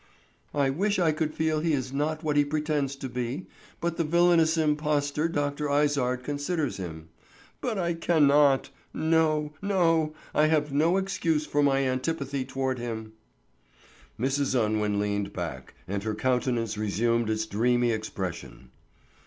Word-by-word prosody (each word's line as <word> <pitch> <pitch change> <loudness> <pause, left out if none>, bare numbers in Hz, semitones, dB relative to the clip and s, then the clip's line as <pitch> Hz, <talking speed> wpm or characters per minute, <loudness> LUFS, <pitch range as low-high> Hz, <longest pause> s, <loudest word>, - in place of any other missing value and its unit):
"I 140 -2 +2
wish 200 +8 0
I 170 -4 +3
could 155 0 -1
feel 155 0 0
he 160 0 0
is 130 -2 -2
not 155 +3 -1
what 150 -2 0
he 145 - +5
pretends 145 -2 -1
to 135 -1 -6
be, 125 +6 -4 0.3
but 170 -1 -2
the 170 - +1
villainous 170 0 +3
impostor 150 -1 +1
Dr. 145 -2 -2
Izard 140 -4 +1
considers 145 +2 -2
him. 80 -3 -7 0.5
But 230 -4 -2
I 170 -2 0
cannot. 145 -4 +3 0.2
No, 155 -2 +1
no, 165 -6 +2 0.2
I 155 - +4
have 150 -2 +1
no 160 +5 +3
such 195 - +1
excuse 165 -5 0
for 145 - 0
my 135 -1 +3
antipathy 135 0 -2
toward 130 -1 -2
him." 110 -2 -5 1.1
Mrs. 135 +1 +1
Unwin 105 -2 0
leaned 100 -1 -1
back, 65 0 -6
and 100 +1 -2
her 110 +1 -2
countenance 120 -3 0
resumed 115 +2 +1
its 110 0 0
dreamy 120 +3 +2
expression. 85 - -5
145 Hz, 145 wpm, -27 LUFS, 120-155 Hz, 1.1 s, he